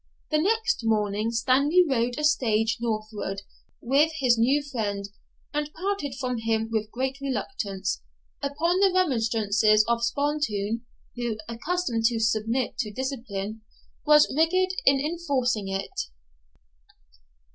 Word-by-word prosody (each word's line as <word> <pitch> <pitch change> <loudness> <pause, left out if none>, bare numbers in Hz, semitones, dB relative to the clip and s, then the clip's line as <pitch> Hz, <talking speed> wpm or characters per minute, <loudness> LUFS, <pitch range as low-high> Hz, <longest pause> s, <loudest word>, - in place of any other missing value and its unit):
The 305 - +3
next 445 +6 +1
morning 215 -1 +1
Stanley 275 +9 +3
rode 245 -2 0
a 300 - -3
stage 225 -8 +2
northward 215 -3 -3 0.4
with 280 +6 +3
his 255 -5 +4
new 265 +6 +2
friend, 210 -8 -3 0.5
and 295 0 -2
parted 365 -6 -2
from 250 -3 -2
him 225 0 0
with 215 -1 -1
great 265 +3 -3
reluctance, 210 - -3 0.4
upon 320 +6 0
the 390 -1 +5
remonstrances 220 - +3
of 235 0 +1
Spontoon, 235 -5 -1 0.3
who, 240 -3 -2
accustomed 235 0 -2
to 230 0 +2
submit 225 +3 0
to 215 -5 -1
discipline, 225 -4 -4 0.4
was 300 -2 +5
rigid 370 +4 +3 0.2
in 275 0 +6
enforcing 275 - -1
it. 195 - -4
240 Hz, 120 wpm, -26 LUFS, 220-295 Hz, 0.5 s, in